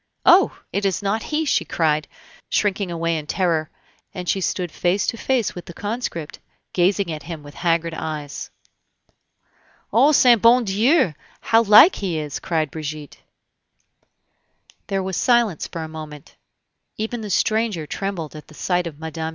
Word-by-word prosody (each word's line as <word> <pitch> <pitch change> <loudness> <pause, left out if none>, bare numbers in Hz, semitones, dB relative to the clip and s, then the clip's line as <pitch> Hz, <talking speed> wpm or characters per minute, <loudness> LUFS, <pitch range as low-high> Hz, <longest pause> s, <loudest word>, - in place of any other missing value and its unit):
"Oh! 365 +3 +5
it 200 - -1
is 195 0 0
not 205 +3 0
he!" 310 +5 -2
she 285 - +2
cried, 155 -2 0 0.4
shrinking 200 -2 0
away 165 -1 -1
in 150 - -10
terror, 165 -4 0 0.5
and 180 -1 -6
she 195 - 0
stood 180 -2 -2
face 180 +3 0
to - - -1
face 245 -2 0
with 175 - -9
the 175 - -11
conscript, 205 -8 -4 0.3
gazing 185 0 +1
at 155 -1 -5
him 160 -1 -8
with 145 0 -12
haggard 165 0 0
eyes. 155 -3 -5 1.4
"O 265 +7 +5
saint 245 -6 +5
bon 235 +2 +6
Dieu! 225 - +2 0.3
how 225 0 +4
like 230 - +7
he 185 -5 -2
is!" 150 -3 -4
cried 160 -5 -1
Brigitte. 155 -2 -7 1.7
There 195 -1 -1
was 190 -1 -3
silence 235 - +2
for 165 - -6
a - - -6
moment; 155 -2 -10 0.6
even 225 +2 -3
the 210 - -6
stranger 215 -5 0
trembled 175 -3 -4
at 155 - -10
the 155 - -16
sight 180 +1 0
of 155 -3 -8
Mme. 160 0 -4
180 Hz, 160 wpm, -22 LUFS, 160-215 Hz, 1.7 s, like